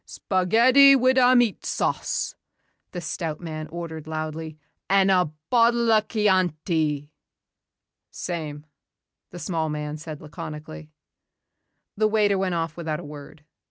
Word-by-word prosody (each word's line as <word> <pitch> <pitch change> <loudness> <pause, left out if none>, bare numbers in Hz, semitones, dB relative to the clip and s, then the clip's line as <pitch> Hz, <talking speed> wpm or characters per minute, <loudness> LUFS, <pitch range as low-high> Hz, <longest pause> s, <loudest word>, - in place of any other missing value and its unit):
"Spaghetti 235 +9 +4
wid' 260 0 +3
a 250 0 +5
meat 240 -5 +2
sauce," - - -2 0.6
the 180 - -5
stout 160 -1 -4
man 155 -2 -6
ordered 160 -2 -7
loudly, 155 0 -5 0.3
"an' 195 0 +4
a 180 -1 +4 0.3
bottle 235 -1 +3
a' 215 -1 +5
Chianti." 170 - 0 1.0
"Same," 155 -4 -6 0.6
the 175 - -10
small 165 -3 -2
man 150 0 -4
said 155 -1 -8
laconically. 150 - -9 1.1
The 215 +1 +3
waiter 210 -2 +2
went 185 -2 -1
off 165 -2 -2
without 155 -3 -4
a - - -8
word. 150 +1 -11
170 Hz, 125 wpm, -24 LUFS, 155-210 Hz, 1.1 s, a